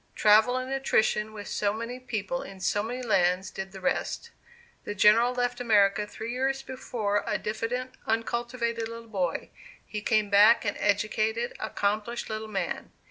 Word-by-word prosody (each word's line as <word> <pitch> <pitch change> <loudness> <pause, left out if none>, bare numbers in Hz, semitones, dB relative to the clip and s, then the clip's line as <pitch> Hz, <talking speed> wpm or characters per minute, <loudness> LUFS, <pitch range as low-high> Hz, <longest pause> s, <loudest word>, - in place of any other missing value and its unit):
Travel 220 +4 +5
and 255 +1 -3
attrition 220 -5 +1
with 205 -2 -8
so 205 -1 0
many 230 +3 -5
people 245 0 -3
in 195 -1 -10
so 205 +2 +1
many 245 +4 -4
lands 185 -4 +2
did 190 0 -6
the 190 - -9
rest. 330 - -2 0.5
The 205 - -5
General 220 +4 +5
left 245 0 -1
America 210 -3 +3
three 220 +2 -6
years 270 +2 -1
before, 220 -6 -2
a - - +1
diffident, 235 +4 -3 0.2
uncultivated 235 0 -1
little 230 0 -9
boy; 185 -5 -2 0.3
he 210 - -5
came 210 -1 +1
back 210 +4 +6
an 205 - 0
educated, 215 +3 0
accomplished 215 +4 -2
little 215 0 -4
man. 200 -3 -3
220 Hz, 155 wpm, -28 LUFS, 205-240 Hz, 0.5 s, back